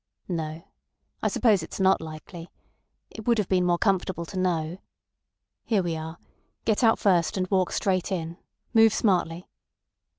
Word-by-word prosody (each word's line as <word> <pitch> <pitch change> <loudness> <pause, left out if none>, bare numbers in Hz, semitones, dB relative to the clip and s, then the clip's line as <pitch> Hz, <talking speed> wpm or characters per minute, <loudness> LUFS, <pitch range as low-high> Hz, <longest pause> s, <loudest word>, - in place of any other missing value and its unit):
"No. 160 -2 -4 0.6
I - - +1
suppose 215 -7 +3
it's 160 - -8
not 190 0 +4
likely. 160 +2 -9 0.6
It 220 0 -10
would 235 -1 +4
have 210 -4 0
been 185 -1 +2
more 175 -1 +3
comfortable 190 -3 0
to 185 +3 -5
know.... 175 -1 -1 0.8
Here 210 -5 +1
we 170 -2 -2
are. 160 +1 -6 0.5
Get 220 +2 +1
out 225 -1 +5
first, 180 -3 +2
and 185 - +1
walk 185 -2 +2
straight 185 0 0
in. 170 -2 -3 0.3
Move 225 -2 +6
smartly." 180 -4 0
185 Hz, 155 wpm, -26 LUFS, 165-200 Hz, 0.8 s, Move